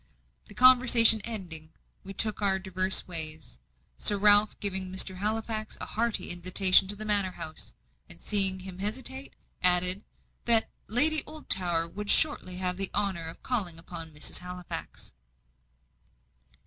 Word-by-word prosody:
The 205 Hz, -, -16 dB
conversation 245 Hz, -3 st, +5 dB
ending, 175 Hz, -8 st, -9 dB, 0.3 s
we 195 Hz, -, -11 dB
took 215 Hz, +2 st, +2 dB
our 195 Hz, -1 st, 0 dB
diverse 190 Hz, 0 st, +1 dB
ways; 155 Hz, -, -6 dB, 0.4 s
Sir 205 Hz, -, +6 dB
Ralph 205 Hz, +1 st, +3 dB
giving 190 Hz, -2 st, -2 dB
Mr. 190 Hz, 0 st, +1 dB
Halifax 215 Hz, +1 st, -5 dB
a -, -, -6 dB
hearty 230 Hz, 0 st, -3 dB
invitation 185 Hz, +2 st, +2 dB
to 205 Hz, -, -1 dB
the 215 Hz, +1 st, -9 dB
manor 200 Hz, -3 st, -2 dB
house, 155 Hz, 0 st, -9 dB, 0.3 s
and 85 Hz, -, -12 dB
seeing 190 Hz, -, +5 dB
him 185 Hz, -1 st, -12 dB
hesitate, 260 Hz, +6 st, -4 dB, 0.3 s
added, 180 Hz, +1 st, +2 dB, 0.4 s
that 230 Hz, -2 st, +4 dB, 0.2 s
"Lady 300 Hz, +8 st, 0 dB
Oldtower 180 Hz, -, +1 dB
would 205 Hz, +4 st, -9 dB
shortly 290 Hz, -, +2 dB
have 180 Hz, -1 st, -3 dB
the 195 Hz, -1 st, 0 dB
honour 190 Hz, -5 st, -3 dB
of 165 Hz, -, -11 dB
calling 200 Hz, -10 st, -4 dB
upon 165 Hz, 0 st, -11 dB
Mrs. 150 Hz, 0 st, -3 dB
Halifax." 180 Hz, 0 st, -10 dB
195 Hz, 135 wpm, -26 LUFS, 180-215 Hz, 0.4 s, Sir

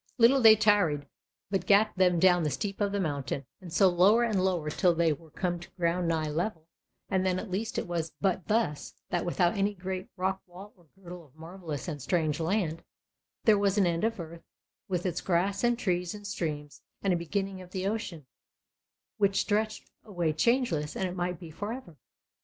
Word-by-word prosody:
Little 255 Hz, +3 st, +6 dB
they 220 Hz, -2 st, +9 dB
tarried, 200 Hz, -9 st, +3 dB, 0.5 s
but 195 Hz, -, -1 dB
gat 205 Hz, +2 st, +5 dB
them 180 Hz, -2 st, +3 dB
down 180 Hz, 0 st, +5 dB
the 155 Hz, -, 0 dB
steep 200 Hz, -, -4 dB
of 200 Hz, -1 st, +1 dB
the 200 Hz, -, -1 dB
mountain, 140 Hz, -5 st, -2 dB, 0.2 s
and 180 Hz, -3 st, -10 dB
so 190 Hz, +3 st, +5 dB
lower 190 Hz, +6 st, +5 dB
and 210 Hz, -5 st, +1 dB
lower 175 Hz, -5 st, 0 dB
till 175 Hz, +1 st, +2 dB
they 165 Hz, -1 st, +3 dB
were 160 Hz, +2 st, -13 dB
come 175 Hz, +2 st, -2 dB
to 175 Hz, -, -12 dB
ground 175 Hz, 0 st, 0 dB
nigh 160 Hz, -2 st, 0 dB
level; 165 Hz, 0 st, -3 dB, 0.4 s
and 190 Hz, -2 st, +1 dB
then 185 Hz, -1 st, +1 dB
at 190 Hz, +1 st, -6 dB
last 220 Hz, +5 st, -2 dB
it -, -, -1 dB
was 165 Hz, -2 st, -3 dB
but 190 Hz, -2 st, 0 dB
thus, 210 Hz, -10 st, -1 dB, 0.2 s
that 175 Hz, -, 0 dB
without 175 Hz, 0 st, +2 dB
any 200 Hz, +1 st, 0 dB
great 185 Hz, 0 st, -5 dB
rock 190 Hz, +1 st, -1 dB
wall 190 Hz, +4 st, -12 dB
or 175 Hz, -4 st, -25 dB
girdle 180 Hz, -2 st, -10 dB
of 140 Hz, -1 st, -25 dB
marvellous 160 Hz, -4 st, -7 dB
and 150 Hz, -5 st, -5 dB
strange 155 Hz, +1 st, 0 dB
land, 165 Hz, -1 st, -1 dB, 0.6 s
there 215 Hz, -3 st, +5 dB
was 200 Hz, 0 st, +1 dB
an 200 Hz, -, +4 dB
end 170 Hz, -1 st, 0 dB
of 225 Hz, -2 st, 0 dB
earth, 170 Hz, 0 st, -8 dB, 0.5 s
with 180 Hz, -2 st, -2 dB
its 175 Hz, -2 st, -1 dB
grass 195 Hz, +3 st, 0 dB
and 240 Hz, 0 st, +3 dB
trees 180 Hz, -4 st, -1 dB
and 205 Hz, 0 st, -10 dB
streams, 150 Hz, -7 st, -4 dB, 0.2 s
and 195 Hz, -2 st, +2 dB
a -, -, +2 dB
beginning 190 Hz, +3 st, -3 dB
of 180 Hz, -, -12 dB
the 185 Hz, 0 st, -4 dB
ocean, 195 Hz, -, -3 dB, 0.9 s
which 195 Hz, -1 st, +3 dB
stretched 215 Hz, +1 st, -1 dB
away 175 Hz, -7 st, -1 dB
changeless, 170 Hz, -, +1 dB
and 190 Hz, -, -1 dB
it 180 Hz, -, -6 dB
might 175 Hz, -1 st, -2 dB
be 170 Hz, -3 st, -10 dB
for 205 Hz, +7 st, -5 dB
ever. 230 Hz, -10 st, -8 dB
180 Hz, 200 wpm, -29 LUFS, 165-200 Hz, 0.9 s, they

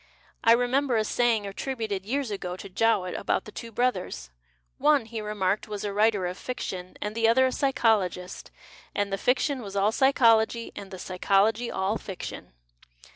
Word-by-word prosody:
I 230 Hz, -, +7 dB
remember 245 Hz, +1 st, +2 dB
a 215 Hz, -, +2 dB
saying 230 Hz, -1 st, +1 dB
attributed, 205 Hz, -2 st, -4 dB
years 270 Hz, -1 st, -1 dB
ago, 180 Hz, -3 st, -4 dB
to 195 Hz, -, -8 dB
Jowett 190 Hz, -2 st, +1 dB
about -, -, -1 dB
the 210 Hz, -, -10 dB
two 230 Hz, +1 st, -8 dB
brothers: 185 Hz, -, -2 dB, 0.5 s
one, 290 Hz, -3 st, +4 dB
he 225 Hz, 0 st, -5 dB
remarked, 210 Hz, -1 st, -1 dB
was 210 Hz, -2 st, -5 dB
a 205 Hz, -1 st, -3 dB
writer 210 Hz, -2 st, +2 dB
of 180 Hz, +1 st, -4 dB
fiction 185 Hz, -7 st, -5 dB
and 210 Hz, 0 st, -3 dB
the 225 Hz, 0 st, +2 dB
other 260 Hz, +3 st, +5 dB
a 260 Hz, -, +1 dB
psychologist, 215 Hz, -10 st, 0 dB, 0.5 s
and 200 Hz, -1 st, -1 dB
the -, -, +1 dB
fiction 255 Hz, +3 st, +1 dB
was 200 Hz, -3 st, -8 dB
all 200 Hz, +2 st, +3 dB
psy 265 Hz, +4 st, +4 dB
chology 230 Hz, -2 st, +3 dB
and 195 Hz, -, -8 dB
the 190 Hz, -, -8 dB
psychology 200 Hz, +5 st, +1 dB
all 195 Hz, +3 st, -1 dB
fiction. 180 Hz, -, -8 dB
215 Hz, 175 wpm, -27 LUFS, 195-240 Hz, 0.5 s, I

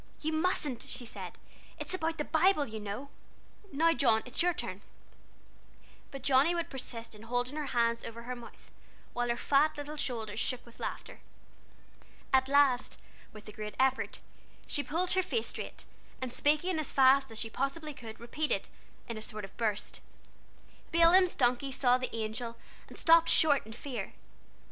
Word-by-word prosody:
"You 315 Hz, +1 st, -1 dB
mustn't," 315 Hz, -6 st, 0 dB
she 245 Hz, -, -5 dB
said; 230 Hz, -, -7 dB, 0.4 s
"it's -, -, -4 dB
about 325 Hz, -2 st, -1 dB
the 300 Hz, -, 0 dB
Bible, 320 Hz, -1 st, +3 dB
you 220 Hz, -3 st, -6 dB
know. 210 Hz, +7 st, -5 dB, 0.6 s
Now 330 Hz, +4 st, +4 dB
John, 230 Hz, -8 st, +3 dB
it's 250 Hz, -, -1 dB
your 355 Hz, +1 st, +4 dB
turn." 190 Hz, -, -5 dB, 1.3 s
But 275 Hz, -2 st, -8 dB
Johnnie 280 Hz, +6 st, +4 dB
would 340 Hz, -1 st, -2 dB
persist 235 Hz, -4 st, -6 dB
in 210 Hz, -, -13 dB
holding 245 Hz, +4 st, -1 dB
her 300 Hz, -2 st, -3 dB
hands 235 Hz, -2 st, +1 dB
over 230 Hz, +1 st, -7 dB
her 250 Hz, +1 st, -4 dB
mouth, 240 Hz, -1 st, -13 dB, 0.4 s
while 245 Hz, 0 st, -1 dB
her 235 Hz, -, +1 dB
fat 295 Hz, +4 st, +3 dB
little 295 Hz, +1 st, -6 dB
shoulders 225 Hz, -6 st, -3 dB
shook 250 Hz, +1 st, -1 dB
with 235 Hz, -, -17 dB
laughter. -, -, -5 dB, 1.1 s
At 260 Hz, 0 st, +4 dB
last, 275 Hz, -3 st, +3 dB, 0.3 s
with 215 Hz, 0 st, -12 dB
a -, -, -7 dB
great 210 Hz, 0 st, -6 dB
effort, 265 Hz, 0 st, +1 dB, 0.4 s
she 290 Hz, -, 0 dB
pulled 340 Hz, +5 st, 0 dB
her 375 Hz, -, +4 dB
face 445 Hz, +5 st, -1 dB
straight, -, -, -7 dB, 0.3 s
and 255 Hz, -2 st, -4 dB
speaking 305 Hz, +6 st, +2 dB
as 310 Hz, -, -2 dB
fast 270 Hz, 0 st, +5 dB
as 225 Hz, -, -6 dB
she 225 Hz, -, -3 dB
possibly 290 Hz, +5 st, -2 dB
could, 225 Hz, -4 st, -10 dB
repeated, 300 Hz, +6 st, -2 dB, 0.4 s
in 230 Hz, -2 st, -4 dB
a -, -, -8 dB
sort 215 Hz, -1 st, -4 dB
of 195 Hz, -, -16 dB
burst: 215 Hz, -3 st, -2 dB, 0.9 s
"Balaam's 345 Hz, +2 st, +6 dB
donkey 250 Hz, +1 st, +1 dB
saw 250 Hz, -1 st, +3 dB
the 255 Hz, -2 st, -4 dB
Angel, 230 Hz, +1 st, -4 dB, 0.3 s
And -, -, -10 dB
stopped 330 Hz, 0 st, +6 dB
short 290 Hz, -7 st, +4 dB
in 220 Hz, -, -8 dB
fear. 240 Hz, -4 st, -5 dB
260 Hz, 170 wpm, -31 LUFS, 230-305 Hz, 1.3 s, Balaam's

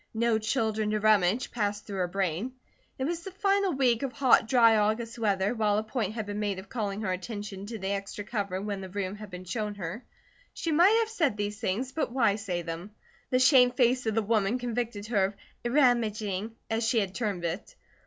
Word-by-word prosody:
"No 230 Hz, -1 st, +2 dB
children 220 Hz, -1 st, 0 dB
to 215 Hz, 0 st, 0 dB
rummage," 215 Hz, +1 st, +3 dB
passed 205 Hz, -3 st, -2 dB
through 195 Hz, -2 st, -5 dB
her 180 Hz, -, +1 dB
brain. 190 Hz, +5 st, -2 dB, 0.4 s
It 260 Hz, -, -2 dB
was 335 Hz, +4 st, -2 dB
the 385 Hz, -, -7 dB
final 395 Hz, 0 st, +1 dB
week 250 Hz, -4 st, +2 dB
of 270 Hz, -2 st, -3 dB
hot, 255 Hz, -4 st, +4 dB
dry 230 Hz, -2 st, +6 dB
August 220 Hz, +3 st, 0 dB
weather, 200 Hz, -1 st, +1 dB
while 210 Hz, -3 st, +1 dB
a 215 Hz, -, 0 dB
point 220 Hz, -2 st, -3 dB
had 220 Hz, -2 st, -3 dB
been 205 Hz, 0 st, -4 dB
made 205 Hz, -2 st, -1 dB
of 190 Hz, +1 st, -9 dB
calling 210 Hz, -4 st, -3 dB
her 195 Hz, -3 st, -1 dB
attention 200 Hz, +1 st, -5 dB
to 225 Hz, 0 st, -5 dB
the 190 Hz, -1 st, -4 dB
extra 200 Hz, +1 st, -3 dB
cover 200 Hz, -3 st, -3 dB
when 200 Hz, -1 st, -4 dB
the 190 Hz, -, -7 dB
room 195 Hz, +1 st, -3 dB
had 210 Hz, -1 st, -9 dB
been 180 Hz, -1 st, -8 dB
shown 210 Hz, +2 st, -3 dB
her. 195 Hz, +5 st, -6 dB, 0.5 s
She 330 Hz, -, -2 dB
might 360 Hz, +8 st, +6 dB
have 445 Hz, -, -1 dB
said 325 Hz, -, 0 dB
these 205 Hz, 0 st, -3 dB
things, 225 Hz, +5 st, -1 dB
but 310 Hz, -4 st, -2 dB
why 230 Hz, -5 st, +2 dB
say 180 Hz, -5 st, -3 dB
them? 170 Hz, +3 st, -6 dB, 0.4 s
The 255 Hz, -, +3 dB
shamed 255 Hz, -1 st, +6 dB
face 250 Hz, -1 st, +3 dB
of 220 Hz, -, 0 dB
the 225 Hz, -, +2 dB
woman 215 Hz, +1 st, +1 dB
convicted 235 Hz, -4 st, -3 dB
her 210 Hz, -4 st, +2 dB
of 200 Hz, +1 st, -4 dB, 0.4 s
"rummaging," 225 Hz, -6 st, +1 dB
as 225 Hz, +1 st, -1 dB
she 225 Hz, +1 st, +2 dB
had 195 Hz, -3 st, -2 dB
termed 200 Hz, -6 st, -2 dB
it. 185 Hz, -, -4 dB
215 Hz, 215 wpm, -28 LUFS, 200-245 Hz, 0.5 s, dry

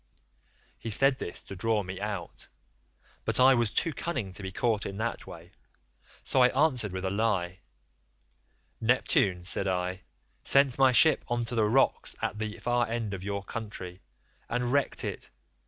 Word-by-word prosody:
"He 115 Hz, -, -5 dB
said 135 Hz, +5 st, +3 dB
this 85 Hz, -, -6 dB
to 100 Hz, -, -9 dB
draw 110 Hz, +2 st, 0 dB
me 95 Hz, 0 st, -7 dB
out, 100 Hz, -5 st, -5 dB, 0.8 s
but -, -, +4 dB
I 130 Hz, +1 st, +7 dB
was 120 Hz, -3 st, +2 dB
too 165 Hz, -, 0 dB
cunning 125 Hz, -, -3 dB
to 95 Hz, -, -7 dB
be 95 Hz, 0 st, -5 dB
caught 110 Hz, +1 st, 0 dB
in 100 Hz, -, -6 dB
that 115 Hz, +2 st, -3 dB
way, 85 Hz, +2 st, -11 dB, 0.7 s
so 130 Hz, -, +3 dB
I 125 Hz, -, +8 dB
answered 130 Hz, -, +1 dB
with 95 Hz, +1 st, -4 dB
a 95 Hz, -, -1 dB
lie; 100 Hz, -4 st, 0 dB, 1.2 s
'Neptune,' 105 Hz, -6 st, +2 dB
said 95 Hz, +2 st, -1 dB
I, 90 Hz, 0 st, -2 dB, 0.4 s
'sent 140 Hz, -2 st, +3 dB
my 135 Hz, -1 st, +6 dB
ship 155 Hz, +6 st, +5 dB
on 120 Hz, 0 st, -1 dB
to 115 Hz, -, -6 dB
the 110 Hz, -2 st, +2 dB
rocks 135 Hz, +4 st, +2 dB
at 105 Hz, -, -3 dB
the 110 Hz, -1 st, -4 dB
far 120 Hz, -2 st, 0 dB
end 115 Hz, -3 st, -3 dB
of 95 Hz, -1 st, -6 dB
your 100 Hz, 0 st, -3 dB
country, 95 Hz, -4 st, -7 dB, 0.5 s
and 125 Hz, 0 st, -1 dB
wrecked 140 Hz, 0 st, +1 dB
it. -, -, -5 dB
110 Hz, 170 wpm, -28 LUFS, 95-125 Hz, 1.2 s, I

